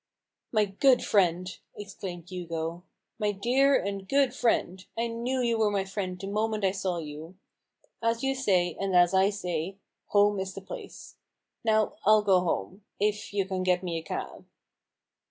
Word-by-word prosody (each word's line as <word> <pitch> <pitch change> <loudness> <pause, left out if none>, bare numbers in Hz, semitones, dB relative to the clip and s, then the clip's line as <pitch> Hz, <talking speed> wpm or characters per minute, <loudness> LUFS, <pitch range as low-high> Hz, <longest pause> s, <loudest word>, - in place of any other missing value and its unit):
" - - -61
My 215 -2 +3
good 245 +6 +3
friend," 180 -3 +2 0.3
exclaimed 190 -4 -7
Hugo, 170 -2 -4 0.2
" - - -53
my 210 -1 +1
dear 255 +7 +3
and 195 0 -4
good 275 -3 +3
friend 190 -7 0
— - - -43
I 230 - +1
knew 240 +3 -2
you 230 -2 +1
were 215 -1 +3
my 200 -2 0
friend 190 -2 -4
the 195 - -6
moment 215 +1 -1
I 190 - +3
saw 185 -2 -2
you 155 +2 -7 0.3
— - - -40
as 230 +1 0
you 270 0 +2
say, 185 -10 +1
and 195 -1 -1
as 175 0 +5
I 190 +1 +5
say, 180 -2 -3 0.3
home 205 0 +3
is 190 0 -4
the 195 - -6
place. 190 - -10 0.5
Now, 220 -2 +2
I'll 215 +1 +5
go 190 -3 +5
home 175 - -2
— - - -48
if 210 0 -7
you 200 -2 0
can 190 -1 -3
get 180 0 +2
me 170 -2 -2
a - - -8
cab." 160 - -6
195 Hz, 190 wpm, -28 LUFS, 180-215 Hz, 0.5 s, as